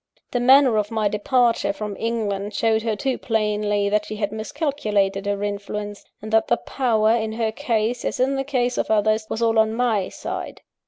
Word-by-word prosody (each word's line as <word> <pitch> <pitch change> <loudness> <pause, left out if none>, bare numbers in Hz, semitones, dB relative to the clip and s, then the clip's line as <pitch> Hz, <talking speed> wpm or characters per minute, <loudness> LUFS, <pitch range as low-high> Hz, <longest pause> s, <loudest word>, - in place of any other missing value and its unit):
_ - - -49
The 245 - 0
manner 260 -1 +5
of 210 -1 0
my 220 -2 0
departure 230 +2 +1
from 205 0 -5
England 210 -3 -2
showed 225 -1 +2
her 220 -1 -1
too 260 +5 -2
plainly 210 -2 0
that 210 +1 0
she 215 - -5
had 205 -1 -2
miscalculated 215 -6 -1
her 205 0 -1
influence, 205 0 -5 0.2
and 215 0 -6
that 220 0 +4
the 240 - +2
power, 225 -5 +1
in 220 -1 0
her 225 -1 -1
case, 235 -2 -1
as - - -3
in 265 +2 +2
the 270 - -1
case 250 -3 -1
of - - -1
others, 215 0 +2
was 230 - -2
all 225 -1 +3
on 220 0 +2
my 225 -6 +1
side. - - -6
220 Hz, 200 wpm, -22 LUFS, 210-240 Hz, 0.2 s, manner